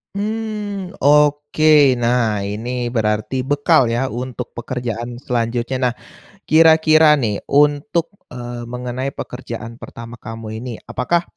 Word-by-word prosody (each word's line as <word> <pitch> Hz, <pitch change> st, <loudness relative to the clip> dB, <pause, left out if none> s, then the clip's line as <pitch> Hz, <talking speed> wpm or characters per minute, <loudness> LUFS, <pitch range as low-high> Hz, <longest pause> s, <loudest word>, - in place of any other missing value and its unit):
Mmm, 210 Hz, -2 st, -4 dB
oke 145 Hz, -1 st, +4 dB
nah 120 Hz, -2 st, +1 dB
ini 105 Hz, +4 st, -4 dB, 0.2 s
berarti 110 Hz, +2 st, 0 dB
bekal 140 Hz, -2 st, +3 dB
ya 120 Hz, +3 st, 0 dB
untuk 125 Hz, 0 st, -5 dB
pekerjaan 120 Hz, -1 st, -5 dB
selanjutnya. 120 Hz, 0 st, -2 dB
Nah, -, -, -5 dB, 0.5 s
kira-kira 160 Hz, -1 st, +6 dB
nih 110 Hz, -8 st, -1 dB
untuk, 150 Hz, +5 st, +2 dB, 0.2 s
eee, 120 Hz, -1 st, -7 dB
mengenai 125 Hz, +2 st, -4 dB
pekerjaan 115 Hz, -2 st, -7 dB
pertama 115 Hz, 0 st, -10 dB
kamu 110 Hz, 0 st, -7 dB
ini 125 Hz, 0 st, -6 dB
apakah, 170 Hz, +7 st, 0 dB
125 Hz, 110 wpm, -19 LUFS, 115-150 Hz, 0.5 s, kira-kira